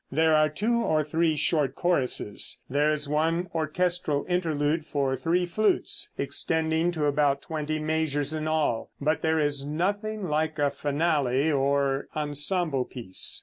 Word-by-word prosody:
There 160 +2 +3
are 155 0 +4
two 215 +10 0
or 155 -7 +1
three 160 +2 +1
short 145 -3 +1
choruses; 135 - 0
there 145 +3 +1
is 150 -1 0
one 165 +4 0
orchestral 165 -1 0
interlude 160 -3 0
for 140 -3 -1
three 175 +6 0
flutes, 215 - 0
extending 160 +1 0
to 155 -3 -1
about 145 -1 +1
twenty 155 -1 -3
measures 155 -2 -1
in 155 0 -3
all, 155 -7 0
but 155 +2 0
there 160 0 +1
is 145 -2 +2
nothing 200 +7 -2
like 155 0 -1
a 145 -1 +1
finale 145 -1 0
or 140 -1 +1
ensemble 150 -1 +1
piece. 115 -8 -1
155 Hz, 145 wpm, -26 LUFS, 145-165 Hz, -, are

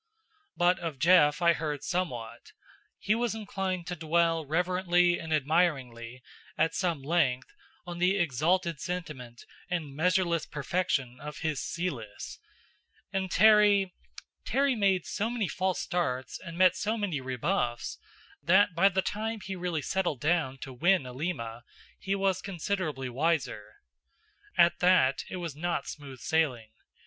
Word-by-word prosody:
But 175 +1 +3
of 165 -5 -4
Jeff 165 +1 +4
I 170 0 +6
heard 150 -3 -4
somewhat; 120 -11 -4 0.4
he 210 - +1
was 235 -1 -1
inclined 190 -4 -3
to 180 0 -4
dwell 165 -1 +1
reverently 175 +1 +2
and 160 -1 -7
admiringly, 135 -6 0 0.3
at 165 - +2
some 170 -7 -1
length, 135 -5 0 0.3
on 175 -1 -6
the 185 +3 +3
exalted 170 +1 +1
sentiment 150 -10 -6 0.2
and 160 -6 -3
measureless 170 0 +1
perfection 145 -4 -2
of 150 +2 -8
his 155 -4 -1
Celis; 130 - -5 0.7
and 190 -1 -1
Terry 205 -2 +5 0.5
Terry 275 0 +2
made 195 -6 +1
so 220 +3 -2
many 235 -5 -1
false 185 0 -1
starts 130 -8 -2
and 170 -2 -9
met 185 0 +5
so 215 +4 -1
many 185 -10 -2
rebuffs, 130 -1 -2 0.4
that 190 +2 +4
by 180 +4 +5
the 190 0 0
time 220 +2 -3
he 190 0 -5
really 175 -4 -2
settled 180 -7 -1
down 150 -3 0
to 135 - -7
win 175 +3 +2
Alima, 125 -4 -4 0.4
he 195 0 -1
was 195 -1 0
considerably 170 -7 -3
wiser. 140 -4 -2 0.7
At 170 -1 +5
that, 180 -7 +3
it - - -5
was 170 -5 -5
not 170 +3 -2
smooth 135 -4 -9
sailing. 130 -9 0
170 Hz, 135 wpm, -29 LUFS, 140-185 Hz, 0.7 s, I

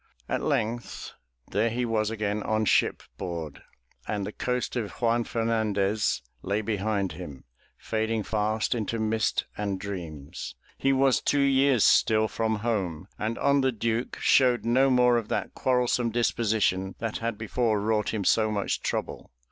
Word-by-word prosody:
At - - -1
length 120 +3 -2 0.4
there 110 +3 +2
he 120 +2 -1
was 110 -2 0
again 105 -1 -2
on 110 +1 0
shipboard 80 -2 -1 0.5
and 105 -2 -2
the 105 - -4
coast 125 +3 -2
of 115 -4 -2
Juan 120 0 +1
Fernandez 110 - 0 0.2
lay 100 +7 -1
behind 100 -2 -1
him, 75 -3 -9 0.3
fading 110 0 -1
fast 110 0 0
into 115 -1 -2
mist 110 0 0
and 100 -2 -2
dreams. 80 -8 -6 0.2
He 135 - +2
was 135 -1 +3
two 145 - +2
years 135 -3 +4
still 110 0 +4
from 110 0 -1
home 95 -6 -2
and 110 +2 -2
on 140 0 +3
the 130 0 +2
Duke 115 +1 -2
showed 125 -3 +4
no 130 +3 +4
more 125 -1 +4
of 115 -2 -2
that - - -2
quarrelsome 125 -2 +1
disposition 110 -5 +1
that 115 -1 -3
had 115 -2 -2
before 110 0 0
wrought 105 0 0
him 110 -3 -2
so 110 +2 +3
much 105 -2 -1
trouble. - - -3
110 Hz, 150 wpm, -27 LUFS, 100-120 Hz, 0.5 s, years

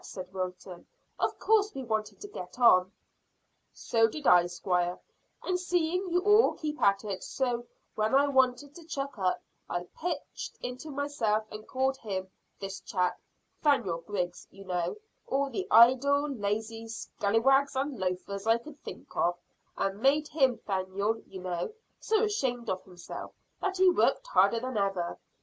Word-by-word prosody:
said 185 0 -8
Wilton. 185 -1 -6 0.3
"Of - - 0
course 430 -1 +2
we 270 - -4
wanted 220 -3 -2
to 410 - -6
get 180 - -8
on." 185 -7 +6 0.8
"So 225 -1 +2
did 295 +6 -7
I, 175 -1 +6
squire, 175 0 -1 0.5
and 365 -1 0
seeing 360 +1 0
you 355 +1 +2
all 415 +3 +5
keep 305 -1 -5
at 200 +1 +4
it 195 -3 -4
so 245 -2 -2 0.3
when 215 +3 +1
I 280 +1 +5
wanted 265 +1 +2
to 340 - -12
chuck 280 -6 -4
up, 185 -1 0 0.3
I 175 0 -2
pitched 325 -3 -5
into 250 +5 -5
myself 270 -7 0
and 215 0 -9
called 265 +1 0
him 190 -5 -4 0.3
this 195 0 -5
chap, 180 -2 -1 0.4
'Thaniel 225 - +2
Griggs, 180 -4 -3
you 195 0 -13
know 180 - -1 0.3
all 275 0 0
the 385 -1 -3
idle, 260 +5 +6
lazy 225 -2 -3
scallywags 230 +5 +1
and 270 -2 -2
loafers 190 +2 -3
I 225 +1 +5
could 285 +5 -12
think - - -10
of, 175 0 +1 0.4
and 195 +1 -1
made 295 +3 +3
him 265 -6 +3
'Thaniel, 200 +3 -2
you 190 -1 -9
know 180 - -3 0.3
so 440 0 +2
ashamed 255 - -1
of 185 - -3
himself 180 -2 -9 0.3
that 380 -1 -1
he 375 0 +5
worked 360 - +2
harder - - +4
than 255 -2 -3
ever. 195 -4 -1
230 Hz, 160 wpm, -29 LUFS, 190-285 Hz, 0.8 s, on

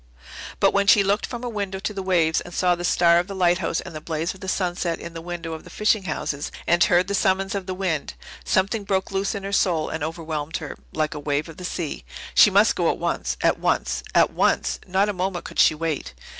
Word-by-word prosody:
But - - +4
when 200 0 +2
she 200 0 +7
looked 200 +1 +1
from 240 -1 -6
her - - -2
window 200 -4 -3
to 210 +2 -4
the 195 - -4
waves 170 -4 +2
and 175 - -10
saw 180 -1 +3
the 175 0 -4
star 170 -1 +4
of 175 - -2
the 200 - -6
lighthouse 180 -1 +1
and 180 - -9
the 155 - -7
blaze 160 +1 -2
of 190 - -15
the 190 - -8
sunset 175 -2 -1
in 170 - -8
the 165 - -7
window 170 -1 -5
of 160 - -7
the - - -13
fishing 210 -2 +1
houses 150 -3 -3
and 170 0 +4
heard 180 +1 +3
the 200 - -2
summons 195 -1 +1
of 195 -2 -4
the 185 - -3
wind, 180 -6 -2 0.3
something 200 +3 +1
broke 195 -1 -1
loose 195 +2 -1
in 200 - -5
her 195 - -4
soul 170 -5 +2
and 160 -2 -4
overwhelmed 160 -1 -3
her, 150 -3 -7 0.2
like 155 -1 -1
a 150 - -6
wave 145 +1 -1
of 165 - -11
the 180 - -9
sea. 170 - -4 0.3
She - - +7
must - - +4
go - - +2
at - - 0
once - - -2
at - - +2
once - - 0
at - - +5
once. - - +1
Not 190 +2 +2
a 210 - -1
moment 185 -1 -3
could - - -6
she 155 - +6
wait. 150 - -3
180 Hz, 245 wpm, -23 LUFS, 165-195 Hz, 0.3 s, she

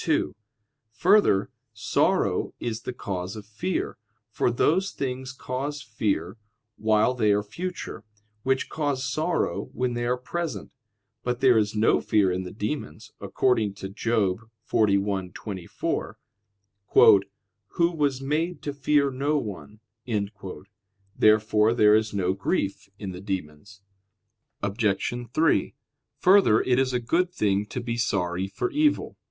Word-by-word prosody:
2: - - 0 0.6
Further, 180 - +3 0.2
sorrow - - +1
is 115 -1 -3
the - - -4
cause 95 -5 -5
of 105 -2 -8
fear, 110 - -3 0.3
for - - +1
those 170 +10 +2
things 130 -3 -4
cause 140 +3 -4
fear 110 -2 -2 0.4
while 110 +3 +2
they 110 -4 +2
are 100 0 +2
future, 170 - -6 0.4
which 130 +2 0
cause 145 -4 -2
sorrow 155 +6 -1
when 125 -1 -1
they 120 0 -2
are 125 +1 +1
present. 165 +6 -4 0.5
But 125 0 -2
there 130 -2 +5
is 105 -1 +1
no 110 +2 +3
fear 105 -4 +2
in 90 +1 -1
the 90 - -7
demons, 105 - -5
according 110 -6 +1
to 95 -1 -7
Job 105 -2 0 0.3
41:24, 100 -2 -1 1.6
"Who 170 0 +2
was 145 -5 0
made 160 +6 -1
to 145 - -3
fear 140 0 +2
no 140 +4 0
one." 105 -3 -6 1.3
Therefore 110 +1 +4
there 105 -3 +6
is 110 0 +1
no 95 -2 0
grief 100 +1 -2
in 100 -2 -5
the 90 0 -8
demons. 95 0 -6 0.8
Obj. 105 +3 -1
3: 160 +5 +2 0.4
Further, 185 - +5
it 125 0 +2
is 130 -1 +2
a 125 - 0
good 170 +9 +1
thing 100 - 0
to 125 - -5
be 120 -1 -3
sorry 95 -5 0
for 100 - -3
evil. 300 0 +1
115 Hz, 130 wpm, -26 LUFS, 100-135 Hz, 1.6 s, there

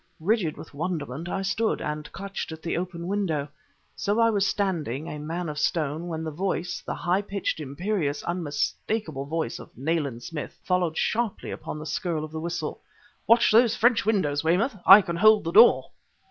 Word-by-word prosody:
Rigid 180 -2 0
with 160 - -11
wonderment 160 -1 -4
I 195 - -2
stood, 215 +3 0
and 150 0 -5
clutched 200 -3 -6
at 160 0 -9
the 170 - -2
open 170 -1 -4
window. 175 -7 -1 0.5
So 205 +3 0
I 230 0 +5
was 200 -2 +2
standing, 165 - -1
a 150 - -6
man 165 +4 -4
of 150 -1 -4
stone, 155 +1 -1
when 160 -2 -4
the 160 - -3
voice, 180 +1 -2
the - - -4
high 180 +3 +1
pitched, 200 -4 -3
imperious, 150 +1 -2
unmistakable 165 0 -2
voice 155 -4 -3
of - - -13
Nayland 140 -4 -2
Smith, 150 +5 -6
followed 180 -3 0
sharply 230 -2 -1
upon - - -6
the 155 - -7
skirl 160 0 -2
of 155 - -7
the 160 - -5
whistle: 170 +1 -4 0.5
"Watch 230 +1 +5
those 230 +1 +5
French 240 -1 +3
windows, 160 -10 +1
Weymouth! 190 +10 +2
I 195 +2 +10
can 170 -1 -3
hold 215 +3 +6
the 165 - -2
door!" 225 +6 +6
170 Hz, 180 wpm, -26 LUFS, 155-200 Hz, 0.5 s, I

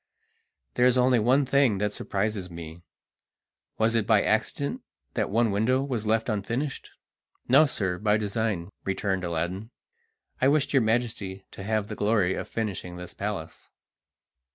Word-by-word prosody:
There 125 0 +4
is 125 0 +3
only 125 -1 +4
one 130 +6 +3
thing 135 -5 +3
that 105 +1 -1
surprises 100 -2 -2
me. 85 0 -9 1.0
Was 110 +1 +2
it 115 -3 +1
by 110 -3 +4
accident 140 - -1 0.3
that - - -1
one 115 +1 +2
window 120 +7 +2
was 120 -6 -3
left 110 +1 +1
unfinished?" 120 +6 -3 0.6
"No, 140 +5 +6
sir, 95 -8 -1
by 105 0 +3
design," 105 -3 -2
returned 95 -1 -1
Aladdin. 85 +5 -3 0.7
"I 130 - +5
wished 145 0 +2
your 135 - +5
Majesty 110 -4 -1
to - - -9
have 105 +1 -1
the - - -5
glory 105 -3 +2
of - - -4
finishing 100 -5 -4
this 90 0 -8
palace." - - -5
110 Hz, 150 wpm, -27 LUFS, 95-125 Hz, 1.0 s, No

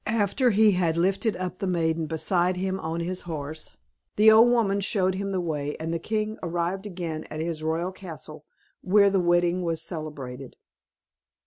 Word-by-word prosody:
After 225 +4 +2
he 215 0 +5
had 175 -3 +1
lifted 195 +5 +1
up 185 0 -5
the 195 - -2
maiden 165 -2 0
beside 175 +3 +1
him 190 +1 -2
on 165 0 -3
his 180 +2 -3
horse, 155 0 -5 0.4
the 215 +1 +7
old 225 +2 +7
woman 215 -5 +2
showed 190 -1 +1
him 195 +1 -3
the 190 -1 -1
way, 150 -4 -3
and 165 +1 -3
the 165 - -1
king 215 +3 -2
arrived 175 +3 -2
again 170 -5 -5
at 155 - -7
his 160 -1 -3
royal 165 +3 -1
castle, 160 -5 -9 0.4
where 200 +1 +4
the 195 - +2
wedding 175 +1 +2
was 165 -2 -2
celebrated. 140 -6 -7
175 Hz, 175 wpm, -26 LUFS, 160-195 Hz, 0.4 s, the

